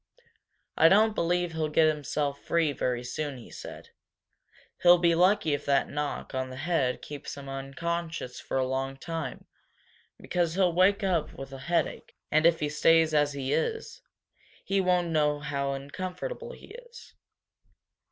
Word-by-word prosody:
"I 165 - +6
don't 215 +3 +5
believe 175 -1 0
he'll 160 -1 -1
get 155 +1 +4
himself 145 -1 -2
free 165 -3 +1
very 125 -2 -2
soon," 140 +2 -4
he 120 - -13
said. - - -10 0.9
"He'll 175 0 +8
be 170 -1 +3
lucky 180 -2 +3
if 145 - -2
that 140 -1 +2
knock 145 -1 -4
on 130 0 -2
the 130 - -8
head 140 -3 -1
keeps 145 -1 -7
him 140 -1 -9
unconscious 135 +1 -4
for - - -3
a 130 - +2
long 135 +1 -2
time, 160 -3 -5 0.7
because 175 -2 -1
he'll 185 -3 +3
wake 195 +4 +3
up 170 -5 0
with 135 0 -9
a 135 - -7
headache, 170 -3 -1 0.2
and 155 +2 +5
if 170 -1 +2
he 150 - +1
stays 160 +1 +3
as 145 -1 +2
he 135 -1 -2
is 465 +1 -2 0.6
he 195 0 +1
won't 180 -2 +2
know 150 -2 +1
how 140 -2 -2
uncomfortable 185 - -6
he - - -13 0.2
is." 470 -1 -14
155 Hz, 160 wpm, -28 LUFS, 140-175 Hz, 0.9 s, He'll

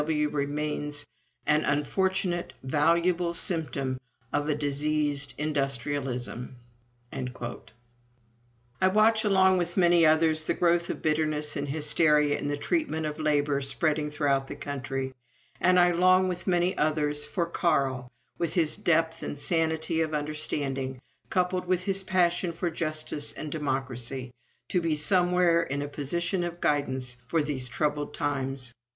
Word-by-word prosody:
W.W. 150 -1 0
remains 145 0 -2 0.4
an 150 0 +3
unfortunate, 175 +4 0
valuable 170 +5 +1
symptom 140 -8 0 0.3
of 145 +1 0
a 150 - +2
diseased 145 0 0
industrialism." 135 -4 -2 0.6
I 120 +1 -7
watch, 215 +3 +4
along 190 -2 +4
with 175 +1 -3
many 175 -2 +5
others, 155 0 +3
the - - +1
growth 170 0 +2
of - - -5
bitterness 155 -1 0
and 145 0 -3
hysteria 150 0 +2
in - - -3
the 145 0 -1
treatment 160 - -1
of 150 +1 -4
labor 145 -2 +1
spreading 150 +2 0
throughout 140 -2 0
our - - -7
country, 135 -1 -4 0.5
and 180 0 +4
I 175 0 +5
long, 185 +2 +4
with 180 +1 -4
many 180 +1 +2
others, 150 -1 +2
for 175 - -1
Carl, 135 -7 0 0.3
with 170 -2 -1
his 165 -4 +2
depth 165 -1 +1
and - - -5
sanity 160 +1 +1
of 155 -1 -1
understanding, 140 -3 -3 0.3
coupled 180 0 0
with 185 0 +1
his 195 0 +2
passion 180 -2 +1
for 170 +1 -2
justice 155 -2 -2
and 155 - -6
democracy, 130 -3 -2 0.4
to 180 - +1
be 165 -2 0
somewhere 180 +1 +3
in 145 -3 -2
a - - -4
position 170 +6 -1
of 175 0 -5
guidance 130 -5 -1
for 165 -2 +1
these 135 -4 +2
troublous 150 +2 -2
times. 135 -4 -1
150 Hz, 135 wpm, -27 LUFS, 140-170 Hz, 0.6 s, many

